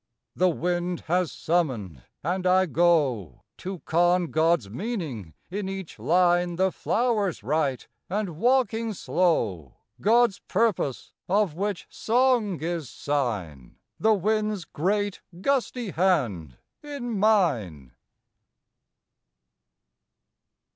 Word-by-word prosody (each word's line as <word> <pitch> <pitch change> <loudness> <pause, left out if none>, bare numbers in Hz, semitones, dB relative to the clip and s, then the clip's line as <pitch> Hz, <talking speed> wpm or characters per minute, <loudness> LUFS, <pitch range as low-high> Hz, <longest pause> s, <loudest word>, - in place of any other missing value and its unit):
The 185 - +3
wind 175 +1 -1
has 180 0 0
summoned, 125 - -1 0.2
and 180 +4 -1
I 185 +1 +4
go, 150 - +1
To 185 -2 -6
con 175 +1 +2
God's 160 -7 +2
meaning 130 - -5 0.2
in 195 0 -3
each 195 -3 -7
line 175 0 +2
The 190 +2 +2
flowers 215 - 0
write, 140 0 -1 0.2
and, 205 +1 -1
walking 230 -1 +1
slow, 115 - 0 0.3
God's 230 -1 +4
purpose, 195 - -1 0.2
of 200 -3 +2
which 200 +3 -3
song 235 -5 +1
is 165 -5 -3
sign, 105 - -3 0.2
The 220 0 +4
wind's 210 -1 0
great, 200 +6 -1 0.2
gusty 250 -2 -1
hand 120 - 0 0.2
in 245 -7 -4
mine. 125 - +1
180 Hz, 100 wpm, -26 LUFS, 145-210 Hz, 0.3 s, I